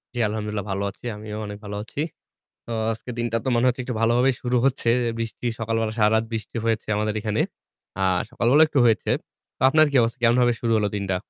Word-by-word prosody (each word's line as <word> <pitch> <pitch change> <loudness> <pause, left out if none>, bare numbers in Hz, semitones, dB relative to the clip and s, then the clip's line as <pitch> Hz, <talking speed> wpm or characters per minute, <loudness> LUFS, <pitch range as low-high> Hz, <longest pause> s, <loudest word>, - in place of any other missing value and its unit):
জি - - -2
আলহামদুলিল্লাহ 105 -1 -3
ভালো 100 +1 -1
আছি 120 - -18
আমিও 105 0 -7
অনেক 105 0 -6
ভালো 105 - -5
আছি। 115 - -9 0.7
তো 120 - -8 0.2
আজকের 115 +2 -6
দিনটা 120 -1 0
তো - - -5
মনে 120 +2 +3
হচ্ছে 125 +1 0
একটু 125 -1 -4
ভালোভাবেই 120 +3 +3
শুরু 125 0 +1
হচ্ছে 130 -3 0 0.2
এ - - -1
বৃষ্টি, 115 +1 -4
সকাল 115 0 -1
বেলা 110 -1 -1
সারারাত 110 +1 +4
বৃষ্টি 110 0 -4
হয়েছে 115 -1 0
আমাদের 105 0 0
এখানে। 105 -1 -1 0.6
আ - - +1 0.3
সকালবেলাও 125 +6 +4
একটু 145 - +1
হয়েছে। 110 -2 +2 0.5
তো - - -30
আপনার 155 +2 +5
কি - - -3
অবস 115 0 +1
কেমনভাবে 120 0 +4
শুরু 115 - 0
হলো 105 -1 +1
দিনটা? 100 -2 -1
115 Hz, 205 wpm, -24 LUFS, 105-125 Hz, 0.7 s, আপনার